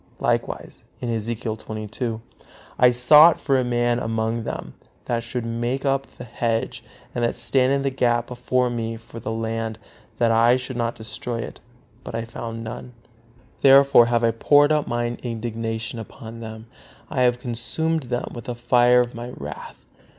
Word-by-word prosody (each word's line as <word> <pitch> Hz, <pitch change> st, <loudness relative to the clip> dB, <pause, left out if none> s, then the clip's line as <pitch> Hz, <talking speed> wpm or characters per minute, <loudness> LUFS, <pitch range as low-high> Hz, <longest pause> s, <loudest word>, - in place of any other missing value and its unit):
Likewise, -, -, -2 dB, 0.2 s
Ezekiel 115 Hz, -1 st, -2 dB
xxii: 110 Hz, +2 st, -4 dB, 0.6 s
"I 125 Hz, -, +7 dB
sought 150 Hz, +7 st, +7 dB
for 140 Hz, -, +1 dB
a 130 Hz, -, +3 dB
man 120 Hz, 0 st, +1 dB
among 115 Hz, 0 st, -2 dB
them, -, -, -5 dB, 0.3 s
that 115 Hz, -1 st, -1 dB
should 120 Hz, 0 st, -4 dB
make 120 Hz, +4 st, -2 dB
up 135 Hz, 0 st, +1 dB
the -, -, -7 dB
hedge, 115 Hz, -1 st, -2 dB, 0.3 s
and 120 Hz, -1 st, 0 dB
stand 130 Hz, +2 st, +2 dB
in 140 Hz, 0 st, +1 dB
the 135 Hz, -, 0 dB
gap 120 Hz, -2 st, +1 dB
before 125 Hz, 0 st, 0 dB
me 115 Hz, -1 st, -3 dB
for 115 Hz, +1 st, -11 dB
the 110 Hz, -, -4 dB
land, 115 Hz, 0 st, -3 dB, 0.4 s
that 115 Hz, -1 st, +3 dB
I 115 Hz, +2 st, +5 dB
should 130 Hz, 0 st, -5 dB
not 115 Hz, -1 st, -1 dB
destroy 110 Hz, +2 st, -4 dB
it; -, -, -8 dB, 0.4 s
but -, -, -7 dB
I 115 Hz, 0 st, -2 dB
found 115 Hz, 0 st, -6 dB
none. 120 Hz, +2 st, -7 dB, 0.7 s
Therefore 135 Hz, -3 st, +7 dB
have 120 Hz, -1 st, +1 dB
I 115 Hz, -, +4 dB
poured 145 Hz, +6 st, +4 dB
out 150 Hz, -1 st, +1 dB
Mine 120 Hz, 0 st, -2 dB
indignation 115 Hz, -1 st, -4 dB
upon 115 Hz, +1 st, -9 dB
them; 110 Hz, -1 st, -8 dB, 0.5 s
I 130 Hz, -, 0 dB
have 125 Hz, -1 st, +3 dB
consumed 130 Hz, +7 st, -1 dB
them 120 Hz, -1 st, -2 dB
with 120 Hz, -, -8 dB
the 125 Hz, -2 st, -4 dB
fire 120 Hz, +1 st, +4 dB
of 120 Hz, 0 st, -3 dB
My 120 Hz, +1 st, -6 dB
wrath." 75 Hz, +1 st, -8 dB
120 Hz, 165 wpm, -23 LUFS, 115-125 Hz, 0.7 s, I